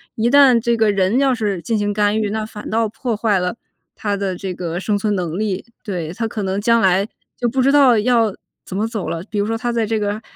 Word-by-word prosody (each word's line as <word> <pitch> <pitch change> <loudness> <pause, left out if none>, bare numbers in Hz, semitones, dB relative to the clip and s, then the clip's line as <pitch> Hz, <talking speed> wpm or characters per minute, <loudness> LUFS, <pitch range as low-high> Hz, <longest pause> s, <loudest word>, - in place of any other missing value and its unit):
一 230 +2 +1
旦 275 -2 +6
这 235 0 +1
个 220 -1 +3
人 195 +3 +1
要 270 -2 +3
是 205 -6 -2
进 220 +7 -1
行 205 0 0
干 205 0 +1
预， 210 -2 -1
那 220 0 -2
反 210 -1 -9
倒 225 0 +1
破 235 +2 -3
坏 210 -3 +2
了 180 +5 -2 0.4
它 205 -1 -2
的 195 -2 -2
这 190 -1 -4
个 175 -1 -4
生 205 +2 0
存 210 +1 0
能 175 -3 -3
力。 200 -3 -2 0.2
对， 175 -7 -4
它 225 +5 -3
可 215 -1 -4
能 190 +1 -1
将 230 +2 +3
来 190 -1 +3 0.3
就 240 - 0
不 260 +3 0
知 270 +2 +4
道 270 -5 +6
要 230 -2 +2 0.3
怎 190 - -5
么 215 +2 0
走 215 -7 -4
了。 165 0 -3
比 215 - -3
如 200 - +1
说 225 +1 -1
它 240 +2 -3
在 230 -1 0
这 220 0 -1
个， 205 +1 -2
210 Hz, 270 characters per minute, -19 LUFS, 195-230 Hz, 0.4 s, 旦